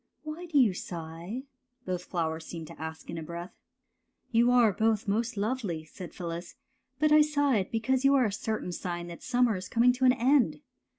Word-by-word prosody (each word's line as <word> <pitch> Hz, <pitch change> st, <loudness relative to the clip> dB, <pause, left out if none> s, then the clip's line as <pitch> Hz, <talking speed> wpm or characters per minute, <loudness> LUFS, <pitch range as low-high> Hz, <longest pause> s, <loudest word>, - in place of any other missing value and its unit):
" -, -, -40 dB
Whj 330 Hz, +3 st, -6 dB
do 305 Hz, -, +1 dB
you 240 Hz, -8 st, +5 dB
sigh? 170 Hz, +7 st, -6 dB, 0.2 s
'' 250 Hz, 0 st, -46 dB
both 180 Hz, -1 st, -3 dB
flowers 160 Hz, -2 st, -2 dB
seemed 165 Hz, -2 st, -6 dB
to -, -, -12 dB
ask 160 Hz, 0 st, -6 dB
in 165 Hz, -, -4 dB
a -, -, -6 dB
breath. 170 Hz, +3 st, -7 dB, 0.4 s
'' -, -, -47 dB
You 235 Hz, +1 st, +4 dB
are 240 Hz, -4 st, +5 dB
both 220 Hz, +1 st, +1 dB
most 225 Hz, +4 st, 0 dB
lovely/' 200 Hz, -7 st, -2 dB
said 180 Hz, +2 st, -9 dB
Phyllis, 170 Hz, 0 st, -6 dB, 0.2 s
'' 260 Hz, 0 st, -47 dB
but 305 Hz, 0 st, +3 dB
I 305 Hz, 0 st, +8 dB
sighed 285 Hz, -9 st, +2 dB
because 250 Hz, +4 st, 0 dB
you 275 Hz, 0 st, +5 dB
are 260 Hz, -3 st, +4 dB
a 210 Hz, -, 0 dB
certain 220 Hz, -3 st, -3 dB
sign 175 Hz, -1 st, -4 dB
that 170 Hz, -, -9 dB
summer 245 Hz, -3 st, +2 dB
is 185 Hz, 0 st, -6 dB
coming 240 Hz, +2 st, +4 dB
to 255 Hz, +1 st, 0 dB
an 250 Hz, -, +7 dB
end. 265 Hz, +2 st, +2 dB
220 Hz, 215 wpm, -29 LUFS, 175-255 Hz, 0.4 s, I